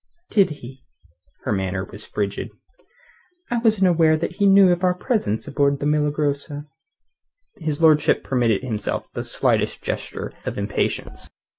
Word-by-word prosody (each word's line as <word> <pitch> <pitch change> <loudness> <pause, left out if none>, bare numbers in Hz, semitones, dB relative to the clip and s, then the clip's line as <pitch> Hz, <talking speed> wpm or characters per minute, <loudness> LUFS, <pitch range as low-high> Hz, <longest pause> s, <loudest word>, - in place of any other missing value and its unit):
"Did 200 -3 +4
he?" 135 -3 -10 0.6
Her - - -2
manner 95 -1 -1
was 105 +3 -12
frigid. 100 -1 -3 1.0
"I 240 - +1
wasn't 215 -5 +3
aware 165 -3 +4
that 170 +2 -4
he 200 -1 +3
knew 195 -1 +7
of 175 +1 0
our 180 -1 +3
presence 180 - -1
aboard 140 -1 +1
the 145 - -3
Milagrosa." 150 0 -1 0.9
His 155 -3 -3
lordship 155 -1 +4
permitted 120 -4 +1
himself 110 -5 -3
the - - -3
slightest - - 0
gesture - - -4
of - - -4
impatience. 100 +1 -3
150 Hz, 140 wpm, -22 LUFS, 120-180 Hz, 1.0 s, knew